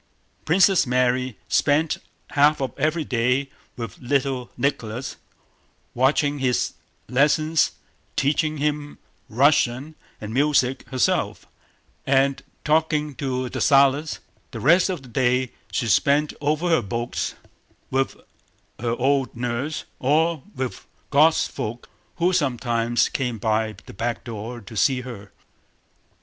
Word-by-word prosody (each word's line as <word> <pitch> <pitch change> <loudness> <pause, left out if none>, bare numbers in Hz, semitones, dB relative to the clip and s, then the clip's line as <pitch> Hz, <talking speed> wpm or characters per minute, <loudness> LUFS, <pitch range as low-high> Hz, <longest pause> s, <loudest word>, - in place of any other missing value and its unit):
Princess 185 -1 +4
Mary 125 -1 +1
spent 150 +2 +2 0.3
half 150 +1 +4
of 135 -1 -2
every 155 +1 0
day 125 +2 0 0.3
with 115 -4 -6
little 130 -1 -1
Nicholas, 125 -3 -2 0.8
watching 145 +3 +2
his 130 -2 0 0.3
lessons, 150 +4 +2 0.4
teaching 155 +2 +1
him 145 0 -2 0.3
Russian 135 +2 +2 0.3
and 105 +1 -6
music 135 -1 +1
herself, 130 -2 0 0.6
and 135 0 +2 0.2
talking 150 -1 +1
to 130 -3 -2
Dessalles; 140 +4 +3 0.3
the - - -7
rest 175 +7 +4
of 175 -7 -3
the - - -12
day 125 +1 +1 0.2
she 120 +6 -1
spent 145 +6 +3
over 155 +4 0
her 165 -6 +4
books, 115 +4 -3 0.6
with 135 0 0 0.6
her 120 0 -1
old 135 0 +1
nurse, 125 +6 -3 0.2
or 155 +3 +2
with 130 -7 -4 0.3
"God's 155 +3 +4
folk" 115 +3 -6 0.3
who 175 +2 +1
sometimes 120 -6 +1
came 125 -4 -2
by 110 0 0
the - - -11
back 115 +4 -3
door 115 +1 -6
to 110 +2 -11
see 130 +4 +2
her. 115 -6 -9
135 Hz, 115 wpm, -23 LUFS, 120-150 Hz, 0.8 s, Princess